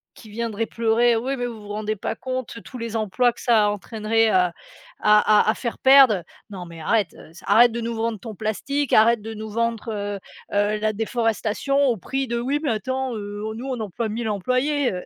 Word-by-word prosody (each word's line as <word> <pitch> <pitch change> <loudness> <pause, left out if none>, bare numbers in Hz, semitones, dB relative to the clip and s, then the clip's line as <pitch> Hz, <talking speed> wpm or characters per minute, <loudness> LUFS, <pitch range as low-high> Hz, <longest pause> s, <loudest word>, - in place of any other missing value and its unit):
qui 220 - -14
viendrait 225 0 -3
pleurer: 230 +1 +2
«Oui, 265 +4 -2
mais 245 - -2
vous 230 -3 -8
vous 205 - -12
rendez 215 +1 -2
pas 205 - -3
compte 255 -2 -5
tous 255 - -9
les 230 -1 -4
emplois 225 +3 +1
que - - -16
ça 220 -4 +4
entraînerait 220 +2 0
à 180 -3 +3 0.5
à 210 0 +5
à - - +2
à - - +4
faire 235 -3 -4
perdre!», 265 -8 +6 0.3
non, 190 -3 -7
mais 170 -1 -11
arrête, 205 0 +1
heu, 155 - -14
c 170 - -14
arrête 230 +4 +6
de 235 - -4
nous 230 0 -3
vendre 225 -1 -2
ton 225 -1 -8
plastique, 265 +7 -2
arrête 225 +1 +5
de 225 +1 -7
nous 215 0 -7
vendre, 230 +1 -2
heu 205 -1 -4 0.3
heu, 205 +1 +1
la 215 0 +1
déforestation 225 +4 0
au 240 - +2
prix 270 +7 -3
de 235 0 -2
«Oui, 270 +5 -1
mais 295 - 0
attends, 260 +4 -2
heu, 205 0 -6
nous 250 +4 -6
on 255 -3 -3
emploie 220 +2 -3
1000 225 +2 -3
employés!», 255 +7 0
heu, 180 - -5
225 Hz, 215 wpm, -23 LUFS, 210-240 Hz, 0.5 s, perdre